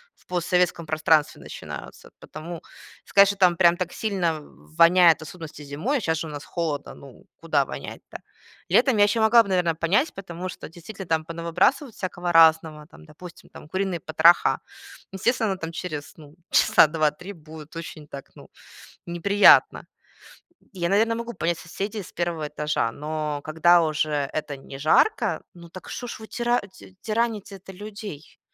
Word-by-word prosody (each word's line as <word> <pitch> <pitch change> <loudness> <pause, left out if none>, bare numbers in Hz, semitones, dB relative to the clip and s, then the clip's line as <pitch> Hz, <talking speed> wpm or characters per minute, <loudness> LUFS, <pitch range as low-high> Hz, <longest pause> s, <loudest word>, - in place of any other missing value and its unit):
в - - -29
постсоветском 180 -1 0
пространстве 155 -1 +1
начинаются. - - -10
Потому 165 +1 -9 0.4
сказать, 200 0 +5
что 200 0 -2
там 180 -3 +4
прям 170 0 +4
так 175 -1 -4
сильно 175 -7 -1 0.4
воняет, 170 0 +6
в - - -14
особенности 160 -1 -10
зимой, 155 - -2
щас 160 -5 0
же 160 - -4
у - - -8
нас 145 -1 -7
холодно, 155 -5 -4
ну, 135 -3 -15
куда 155 -4 0
вонять-то? - - -9 0.5
Летом 260 -5 +3
я 205 - +6
еще 205 +2 +2
могла 230 +1 +6
бы, 200 - -9
наверно, 175 -3 +1
понять, 190 - +1
потому 185 -1 -7
что - - -9
действительно 180 +4 -10
там 160 -1 0
понавыбрасывают 170 - 0
всякого 180 -2 -4
разного, 160 -2 +4
там, 165 - -17
допустим, 170 +3 -13
там - - -13
куриные 185 -1 -2
потроха. 165 +3 +4 0.5
Естественно, 215 0 0
там 165 -2 -6
через, 160 -4 -6
ну, 150 -1 -15 0.2
часа 155 - +5
2-3 155 +4 -2
будет 155 -2 -13
очень 160 -2 -8
так, 140 -1 -10
ну, - - -15 0.6
неприятно. 200 +4 +4 0.9
И 185 - -11
я, 170 - +1
наверно, 220 +4 +2
могу 235 +1 -5
понять 170 -1 -1
соседей 200 +5 -5
с - - -14
1 170 -3 -3
этажа, 150 -6 -1
но 150 +1 -4
когда 170 +2 +4
уже 155 -1 -1 0.2
это 150 -2 -4
не 135 0 -11
жарко, 160 - +2
ну 170 -1 -13
так 185 +2 -12
что 245 - -6
ж 235 - -7
вы 220 - -9
тира 240 0 0
ть 190 0 -17
тираните-то 215 -4 -3
людей? 205 -5 -10
170 Hz, 160 wpm, -24 LUFS, 155-195 Hz, 0.9 s, воняет